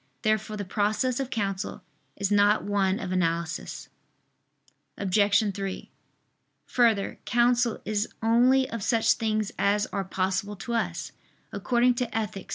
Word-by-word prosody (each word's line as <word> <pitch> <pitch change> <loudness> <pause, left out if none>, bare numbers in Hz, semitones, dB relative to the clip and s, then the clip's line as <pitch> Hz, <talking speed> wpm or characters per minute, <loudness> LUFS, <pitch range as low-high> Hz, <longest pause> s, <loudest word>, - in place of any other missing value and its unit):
Therefore 215 -1 0
the 205 - -4
process 215 +6 0
of 270 -2 -3
counsel 195 -4 -3 0.3
is 200 0 -2
not 205 +1 +4
one 200 -1 +1
of 185 - -5
analysis. 170 -2 -2 1.1
Obj. 205 +1 +2
3: 195 -1 -5 0.7
Further, 225 -5 +1
counsel 240 0 +2
is 210 0 -1
only 250 +4 +4
of 230 -1 -4
such 225 +2 +3
things 215 -2 -1
as 205 +1 +2
are 195 - -1
possible 190 +2 -2
to 235 +5 -6
us, 230 - -2 0.4
according 245 0 +2
to 245 0 -2
_Ethic. 215 -4 -4
210 Hz, 130 wpm, -27 LUFS, 195-230 Hz, 1.1 s, not